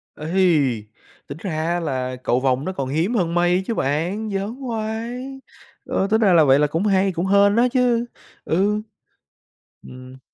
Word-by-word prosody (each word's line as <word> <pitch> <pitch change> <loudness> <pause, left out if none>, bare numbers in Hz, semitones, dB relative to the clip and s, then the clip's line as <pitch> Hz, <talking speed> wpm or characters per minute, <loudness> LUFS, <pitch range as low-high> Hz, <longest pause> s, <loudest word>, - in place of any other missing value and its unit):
Ây, 155 - +1 0.4
tính 140 - -7
ra 190 - -4
á 160 +3 -1
là 130 -5 -3
cầu 125 - +1
vồng 130 +1 0
nó 185 - -2
còn 135 -7 -4
hiếm 165 - 0
hơn 170 -5 0
mây 175 +2 +2
chứ 230 - -1
bạn, 175 +10 -1
giỡn 200 +4 -3
hoài, 240 +1 -5 0.5
ơ, 195 - -1
tính 220 +1 +3
ra 195 -4 +4
là 165 -2 +6
vậy 135 0 +4
là 150 - +3
cũng 165 +7 -2
hay, 195 -1 +2
cũng 175 0 -3
hên 200 +1 +4
á 240 +2 +4
chứ, 245 -2 +2 0.4
ừ. 205 +5 +1 1.1
Ừm. 130 +1 -12
180 Hz, 175 wpm, -21 LUFS, 150-215 Hz, 1.1 s, là